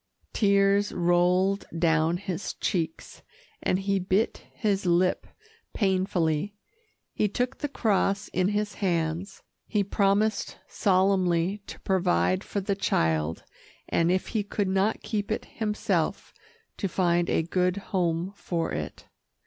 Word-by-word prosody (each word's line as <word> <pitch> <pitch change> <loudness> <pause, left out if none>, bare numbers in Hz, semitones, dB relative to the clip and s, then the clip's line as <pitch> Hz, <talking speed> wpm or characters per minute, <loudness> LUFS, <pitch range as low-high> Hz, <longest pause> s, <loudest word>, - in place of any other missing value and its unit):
Tears 200 -1 +3
rolled 180 +3 +2
down 165 0 +2
his 190 -1 -4
cheeks, 160 -3 -3 0.4
and 185 - +1
he 195 0 0
bit 190 +4 0
his 200 -3 0
lip 175 +1 +2 0.5
painfully. 190 -2 0 0.6
He 210 - +1
took 245 +5 -2
the 290 - -1
cross 205 -5 +1
in 185 0 +1
his 205 0 -1
hands 175 +1 -1 0.2
he 210 -2 +1
promised 200 +2 +1
solemnly 185 -1 +2
to - - -9
provide 185 0 +1
for 200 - -3
the 200 +1 0
child, 80 - 0 0.5
and 165 0 +2
if 185 0 0
he 220 - 0
could 205 0 -2
not 195 +3 +1
keep 205 -2 -2
it 220 - -2
himself, 210 -2 -2 0.4
to 200 - -1
find 175 -2 +1
a - - +2
good 180 +2 0 0.2
home 175 0 0
for 170 -4 -2
it. 75 -1 -5
190 Hz, 125 wpm, -27 LUFS, 175-200 Hz, 0.6 s, Tears